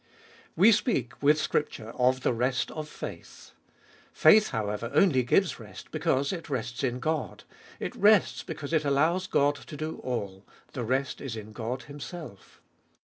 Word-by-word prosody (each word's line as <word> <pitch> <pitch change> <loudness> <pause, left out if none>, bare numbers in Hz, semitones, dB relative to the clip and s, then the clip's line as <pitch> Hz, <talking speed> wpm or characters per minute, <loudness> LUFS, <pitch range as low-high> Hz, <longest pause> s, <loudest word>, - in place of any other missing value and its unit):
WE 200 +7 +7
speak, 210 - 0
with 150 +2 +4
Scripture, 130 -8 -2
of 130 +1 +2
the - - +1
rest 125 +2 0
of 155 -1 -6
faith. - - -9 0.6
Faith, 210 +7 +6
however, 110 0 -3
only 155 -6 +5
gives 165 +9 +1
rest 105 -5 -11
because 140 +6 0
it 170 -3 -7
rests 120 -1 -3
in 125 -2 0
God; 155 +4 -2 0.4
it - - -4
rests 210 -1 +4
because 145 +2 -6
it 155 -1 +3
allows 155 +6 +2
God 145 -4 +3
to 150 - -10
do 155 +2 -4
all; 100 -6 -4 0.3
the 125 - -3
rest 130 +3 -1
is 135 -5 -5
in 110 -1 -8
God 120 +3 -4
Himself. 145 - -10
140 Hz, 155 wpm, -28 LUFS, 120-155 Hz, 0.6 s, WE